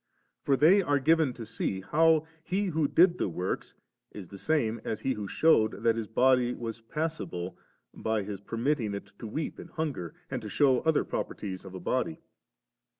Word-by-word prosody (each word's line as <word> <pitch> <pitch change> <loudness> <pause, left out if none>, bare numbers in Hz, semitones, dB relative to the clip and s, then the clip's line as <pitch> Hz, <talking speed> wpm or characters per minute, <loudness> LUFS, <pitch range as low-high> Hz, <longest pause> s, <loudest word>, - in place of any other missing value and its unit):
For 135 - +2
they 180 +8 +6
are 145 -5 +2
given 155 0 +3
to 115 -2 -8
see, 105 -3 -3
how 160 +7 +3 0.2
He 190 +4 -1
who 155 -2 +2
did 175 +4 +4
the - - 0
works 90 +2 -3 0.4
is 95 -4 -9
the 100 - -9
same 115 -7 0
as 110 - -3
He 135 - 0
who 105 -3 -5
shewed 110 -5 +4
tliat 115 0 +1
His 115 -2 -3
body 125 +1 +3
was 115 -1 -6
passible 115 - -4 0.4
by 110 -2 -1
His 100 -1 -6
per 115 - -6
mitting^ 120 -5 0
it 100 - -6
to 115 - -6
weep 150 +8 -4
and - - -9
hunger, 145 - -4 0.2
and 130 -2 -2
to 105 - -6
shew 135 +2 +4
other 160 -2 +2
properties 95 -2 -4
of 95 -1 -9
a - - -5
body. 90 -3 -1
120 Hz, 190 wpm, -29 LUFS, 105-155 Hz, 0.4 s, they